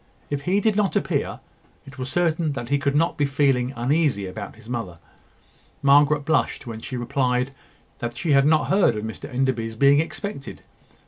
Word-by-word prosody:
If 145 -1 -1
he 195 +2 +3
did 215 0 +1
not 205 -3 +1
appear, - - -1 0.4
it 140 0 -13
was 130 0 -4
certain 165 -2 +1
that 120 -3 -6
he 140 - +2
could 140 0 0
not 165 +4 +1
be 145 -2 +2
feeling 135 -3 +1
uneasy 130 -3 +1
about 100 +2 -7
his 110 0 -16
mother. 115 -8 -4 0.9
Margaret 145 +1 +4
blushed 160 - 0
when 115 -2 -7
she 125 - -5
replied 125 0 0 0.5
that 120 0 -4
she 165 +2 -1
had 140 0 +5
not 155 0 +3
heard 195 - +3
of 105 - -4
Mr 110 0 -7
Enderby's 125 -3 -1
being 140 +4 +5
expected. 165 -1 -5
140 Hz, 180 wpm, -23 LUFS, 120-150 Hz, 0.9 s, had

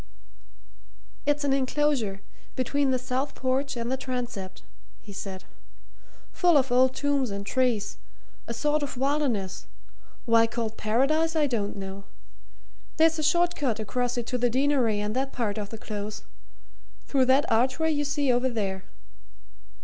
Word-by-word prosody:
"It's 290 0 +2
an 280 -1 +2
enclosure 260 -7 0 0.3
between 275 +2 +1
the 260 - +2
south 255 +3 -2
porch 265 +1 -1
and 235 +1 -2
the 265 - 0
transept," 240 -7 -5 0.4
he 200 - -12
said. 190 -1 -6 0.9
"Full 350 -4 +4
of 265 -2 +1
old 255 +1 +4
tombs 280 -3 +1
and 200 0 -5
trees 235 -3 0 0.5
a 235 - -3
sort 300 +4 +1
of 280 -3 -4
wilderness 260 -9 -1 0.6
why 230 -1 +5
called 225 -1 -3
Paradise 300 +10 +1
I 310 -2 +3
don't 220 -7 -1
know. 195 0 -7 0.9
There's 325 0 +4
a - - -1
short 345 +3 +3
cut 250 -7 -1
across 245 +3 -1
it 240 - -1
to 250 - -2
the 245 0 +3
Deanery 255 -4 +2
and 210 +2 -2
that 270 +1 -1
part 220 -3 -2
of 205 -1 -5
the 225 - -7
Close 210 -1 -6 0.8
through 270 -2 +2
that 265 +4 +4
archway 265 +8 +2
you 290 -1 0
see 285 -2 +1
over 250 +2 +2
there. 195 -5 -3
255 Hz, 150 wpm, -27 LUFS, 220-285 Hz, 0.9 s, why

